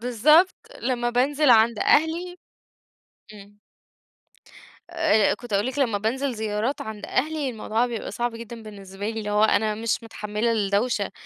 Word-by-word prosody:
بالضبط، 300 - +4 0.3
لما 240 -2 -1
بانزل 275 +4 +2
عند 225 -1 +5
أهلي 335 +4 +1 1.0
إمم. 205 0 -15 1.3
آآ، 315 -11 +2
كنت 220 0 -9
هاقول 205 +5 +1
لِك 265 +2 -4
لمّا 230 -6 +1
بانزل 255 +6 -2
زيارات 220 +4 -2
عند 215 -1 -7
أهلي، 300 +1 -1
الموضوع 225 0 -1
بيبقى 235 -3 -5
صعب 240 -1 -3
جدًا 230 0 -9
بالنسبة 200 -1 -7
لي، 225 - -4
اللي 210 -1 -5
هو 210 +1 +2
أنا 215 0 +2
مش 225 +1 -2
متحملة 215 +1 -2
الدوشة 205 0 0
230 Hz, 145 wpm, -24 LUFS, 210-260 Hz, 1.3 s, عند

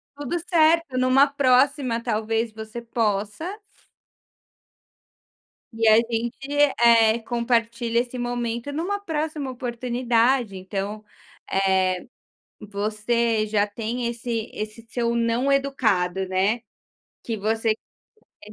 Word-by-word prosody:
Tudo 290 +4 -3
certo 330 -4 +2
numa 255 +2 +5
próxima 265 -2 +2
talvez 225 +1 -1
você 220 +2 -8
possa 230 - -2 2.2
e 225 0 +1
a 215 - +8
gente, 230 +1 -1 0.4
eh, 230 -1 +5
compartilha 235 0 0
esse 250 +1 -7
momento, 240 +2 -3
numa 365 +7 -2
próxima 310 -6 -3
oportunidade, 245 -2 0
então, 195 +3 -4 0.5
eh, 190 0 +2 0.8
você 215 +2 -1
já 210 -1 +2
tem 230 +4 -4
esse 235 -1 -3
esse 215 +2 -6
seu 235 0 -1
não 235 +3 +1
educado, 200 -10 +1
né? 195 +5 +1 0.6
Que 225 -2 -4
você 220 +2 0 0.7
quer 210 - -13
235 Hz, 100 wpm, -24 LUFS, 215-255 Hz, 2.2 s, a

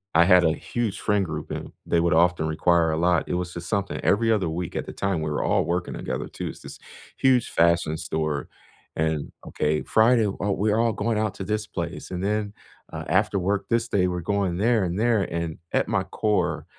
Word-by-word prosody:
I 85 - +7
had 90 -2 +6
a 80 - +3
huge 115 0 -3
friend 105 -2 +1
group, 75 -2 -6
and - - -6
they 85 - +2
would 85 -1 +2
often 85 -1 +3
require 85 +1 +2
a - - 0
lot. 85 -1 +2
It - - -2
was 90 -1 -3
just 85 -1 -7
something 100 -2 -1
every 115 +3 +2
other 95 -7 +1
week 85 +1 -4
at - - -3
the - - -8
time, 95 -5 -1
we 75 - -2
were 75 - -1
all - - +2
working 85 +1 -2
together - - -4
too. - - -5
It's - - -8
this - - -10 0.4
huge 130 -3 +3
fashion 85 -2 +2
store 80 -2 -2 0.5
and, 80 -2 -1 0.2
"Okay, 75 0 0
Friday. 115 0 +4
Oh, 100 +1 -2
we're 105 +2 +1
all 115 -1 +2
going 110 +1 -1
out 110 -2 -1
to 95 - -5
this 105 0 -2
place 85 +1 -5
and 90 +1 -3
then, 105 0 -1 0.4
uh, - - -5
after 100 - +2
work 100 +2 -1
this 115 0 +1
day, 90 -2 +2
we're 90 -1 -2
going 95 -1 -1
there 110 0 +2
and 90 +1 -3
there," 115 -3 +3
and 85 -1 -4 0.2
at - - +2
my - - +1
core, 90 -8 -1
90 Hz, 220 wpm, -25 LUFS, 85-105 Hz, 0.5 s, I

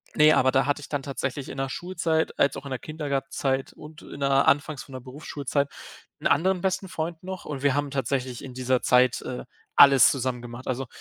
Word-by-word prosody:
ne, 150 0 +7
aber 130 0 +4
da 135 - +3
hatte 145 +1 0
ich 145 - -9
dann 145 -2 -3
tatsächlich 135 0 -4
in 135 - -7
der 135 - -1
Schulzeit, 165 -1 -1
als 140 - +3
auch - - -8
in 140 - -6
der 130 - -3
Kindergartenzeit 135 -3 -2
und 150 0 -12
in 140 - -10
der 140 0 +3
anfangs 145 0 +2
von 135 - -15
der 130 - -5
Berufsschulzeit 140 +1 -3 0.5
'n - - +2
anderen 180 +3 +2
besten 190 0 -1
Freund 165 -1 -4
noch, 190 0 -6
und 145 -3 -6
wir 140 -2 +3
haben 145 -1 -1
tatsächlich 130 -1 -2
in 130 - -9
dieser 130 0 0
Zeit, 125 0 +3
äh, 125 - -5 0.3
alles 140 -2 +8
zusammen 130 -2 -2
gemacht. 120 +1 -9
Also, 130 0 -2
140 Hz, 215 wpm, -26 LUFS, 130-150 Hz, 0.5 s, alles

